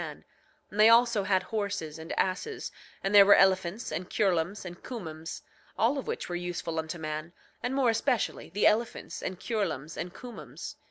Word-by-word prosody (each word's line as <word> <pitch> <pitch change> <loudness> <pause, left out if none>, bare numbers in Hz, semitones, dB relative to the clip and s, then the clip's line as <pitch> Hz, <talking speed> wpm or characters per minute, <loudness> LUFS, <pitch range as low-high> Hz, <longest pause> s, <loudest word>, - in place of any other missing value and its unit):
9:19 - - -7 0.5
And 205 - -6
they 215 +1 +8
also 235 -2 +5
had 190 -1 +2
horses, 200 -8 -3
and 160 +1 -7
asses, 190 - -1 0.3
and 195 +1 0
there 200 -1 +10
were 200 +1 +8
elephants 190 +3 +2
and 180 +1 -4
cureloms 190 0 0
and 175 -1 -8
cumoms; 165 -9 -6 0.3
all 255 +6 +2
of - - -7
which - - -3
were 175 - -5
useful 175 -2 -3
unto 160 +1 -4
man, 155 +1 -5 0.3
and 250 +2 -2
more 260 -4 +4
especially 225 +1 0
the 200 +5 0
elephants 230 +2 +1
and 185 -1 -4
cureloms 165 - -2
and 175 - -4
cumoms. 240 +5 -8
190 Hz, 175 wpm, -29 LUFS, 170-225 Hz, 0.5 s, there